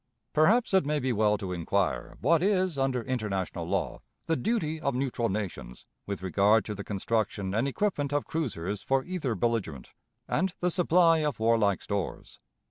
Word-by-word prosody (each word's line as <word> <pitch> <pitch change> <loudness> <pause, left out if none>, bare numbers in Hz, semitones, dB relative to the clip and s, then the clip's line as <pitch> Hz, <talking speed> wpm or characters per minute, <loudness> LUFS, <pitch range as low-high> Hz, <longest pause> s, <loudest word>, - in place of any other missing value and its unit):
Perhaps 210 +10 +3
it 190 - +5
may 150 +2 0
be 130 -3 0
well 105 -1 +2
to 95 -2 -4
inquire 90 +2 -1
what 160 +5 +3
is, 185 -3 +2
under 135 -3 0
international 105 -7 -3
law, - - -2 0.2
the 165 - +1
duty 160 -7 -1
of 140 -4 0
neutral 125 -3 -1
nations 90 - -5 0.2
with 100 -2 -4
regard 100 +4 +3
to 105 - -4
the 100 0 -6
construction 100 -1 -1
and 115 +6 +1
equipment 145 -2 -1
of 145 0 0
cruisers 105 - -3
for 135 +5 +1
either 170 -10 -2
belligerent, 100 - -2 0.4
and 185 +2 0
the 180 0 +1
supply 170 -1 +4
of 150 -6 -1
warlike 110 -3 +2
stores. 100 -3 -4
125 Hz, 165 wpm, -28 LUFS, 100-155 Hz, 0.4 s, it